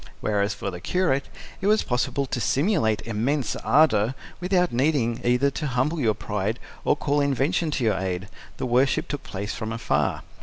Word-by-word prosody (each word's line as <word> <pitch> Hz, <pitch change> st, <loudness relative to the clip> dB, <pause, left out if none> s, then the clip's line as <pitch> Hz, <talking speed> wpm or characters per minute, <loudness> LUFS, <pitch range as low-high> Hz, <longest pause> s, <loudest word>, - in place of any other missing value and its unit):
Whereas 105 Hz, -1 st, 0 dB
for 100 Hz, -, -4 dB
the 90 Hz, -, -7 dB
curate 140 Hz, -, 0 dB, 0.3 s
it 195 Hz, -, 0 dB
was 215 Hz, +1 st, +4 dB
possible 125 Hz, +3 st, 0 dB
to 125 Hz, -2 st, -3 dB
simulate 110 Hz, -, +1 dB
immense 115 Hz, +4 st, -1 dB
ardour, 125 Hz, -3 st, +3 dB, 0.2 s
without 180 Hz, 0 st, +2 dB
needing 125 Hz, -3 st, +1 dB
either 125 Hz, +3 st, +3 dB
to 150 Hz, +2 st, -3 dB
humble 135 Hz, +6 st, 0 dB
your 110 Hz, -6 st, +2 dB
pride 105 Hz, +2 st, -2 dB, 0.3 s
or -, -, +3 dB
call 145 Hz, 0 st, 0 dB
invention 140 Hz, +5 st, +1 dB
to 140 Hz, -4 st, -1 dB
your 105 Hz, -5 st, +2 dB
aid: 95 Hz, 0 st, -3 dB, 0.3 s
the -, -, -2 dB
worship 125 Hz, +2 st, +2 dB
took 145 Hz, -, -4 dB
place 100 Hz, +2 st, -5 dB
from 110 Hz, -2 st, -4 dB
afar. 115 Hz, -, 0 dB
125 Hz, 175 wpm, -25 LUFS, 110-145 Hz, 0.3 s, was